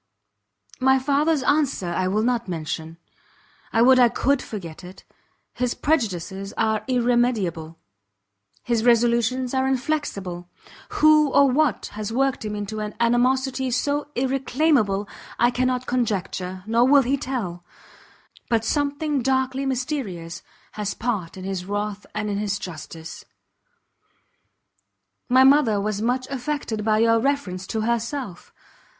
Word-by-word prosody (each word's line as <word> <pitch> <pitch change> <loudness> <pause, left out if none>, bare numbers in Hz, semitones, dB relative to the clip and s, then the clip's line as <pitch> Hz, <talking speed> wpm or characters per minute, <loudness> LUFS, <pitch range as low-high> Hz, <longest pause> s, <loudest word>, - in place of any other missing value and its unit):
My 265 0 +4
father's 285 +2 +1
answer 280 - +1
I 185 +2 0
will 210 +3 +1
not 240 -2 0
mention; 160 -1 -5 0.7
I 225 - +3
would 255 +1 +6
I 245 -1 +6
could 275 +3 +1
forget 175 -6 -8
it! 180 +1 -12 0.5
his 245 0 -1
prejudices 195 - -2
are 220 -1 +1
irremediable, 235 -10 0 0.9
his 235 -2 0
resolutions 240 +1 +2
are 265 0 +1
inflexible. 240 - -2 0.5
Who 305 -1 +6
or 275 0 +4
what 280 -4 +1
has 210 +1 -5
worked 270 +1 0
him 210 -1 -4
into 205 +1 -5
an 210 0 -5
animosity 255 +2 +1
so 285 +4 -1
irreclaimable, 260 -5 +1 0.3
I 240 +1 +3
cannot 255 0 0
conjecture, 190 -6 -2
nor 230 +3 +3
will 280 0 +6
he 260 +3 +1
tell; 225 -11 -4 0.9
but 225 -1 +1
something 290 +1 0
darkly 265 +1 0
mysterious 245 - -3 0.3
has 210 -1 -4
part 210 -8 -3
in 185 - -8
his 190 -1 -4
wrath 205 +1 -4
and 210 0 -2
his 205 0 -1
injustice. 165 -1 -8 2.1
My 255 +1 +6
mother 265 -6 +5
was 210 0 -2
much 250 +3 0
affected 255 -5 -3
by 215 0 +2
your 230 +1 +4
reference 225 -9 -2
to 220 - -2
herself. 235 -2 -3
235 Hz, 125 wpm, -23 LUFS, 200-265 Hz, 2.1 s, would